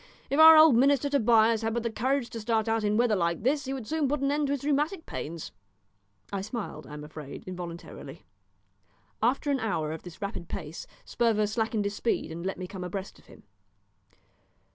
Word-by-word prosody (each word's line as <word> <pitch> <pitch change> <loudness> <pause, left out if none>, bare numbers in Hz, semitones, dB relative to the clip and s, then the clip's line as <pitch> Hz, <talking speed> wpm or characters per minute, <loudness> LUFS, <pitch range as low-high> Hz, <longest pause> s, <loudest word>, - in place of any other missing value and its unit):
If 280 - +1
our 320 0 +10
old 310 -4 +8
minister 280 +2 +3
Tobias 225 -4 +4
had 225 0 -1
but 235 - -1
the 235 - -2
courage 255 +3 -1
to 230 - -5
start 220 0 0
out 225 -1 +1
in 210 0 +1
weather 235 -2 +3
like 170 -1 -1
this 280 +3 +1
he 265 - -3
would 260 -4 -5
soon 310 +2 0
put 290 +2 0
an 275 0 +1
end 295 0 +1
to 280 - 0
his 280 - -4
rheumatic 300 +5 0
pains." 165 +1 -6 0.8
I 195 - -1
smiled, 215 +2 -6
I 150 - -10
am 150 - -8
afraid, 150 -2 -9
involuntarily. 175 -2 -8 1.0
After 265 +5 +1
an 275 - +1
hour 160 -10 -1
of 160 - -6
this 175 -3 -11
rapid 200 -4 -5
pace 160 -3 -6 0.2
Sperver 225 -3 +1
slackened 220 0 -1
his 200 - -1
speed 230 - -1
and 170 +1 -6
let 190 +1 -3
me 185 - -5
come 185 0 -7
abreast 190 +2 -6
of - - -23
him. - - -16
225 Hz, 205 wpm, -28 LUFS, 190-275 Hz, 1.0 s, our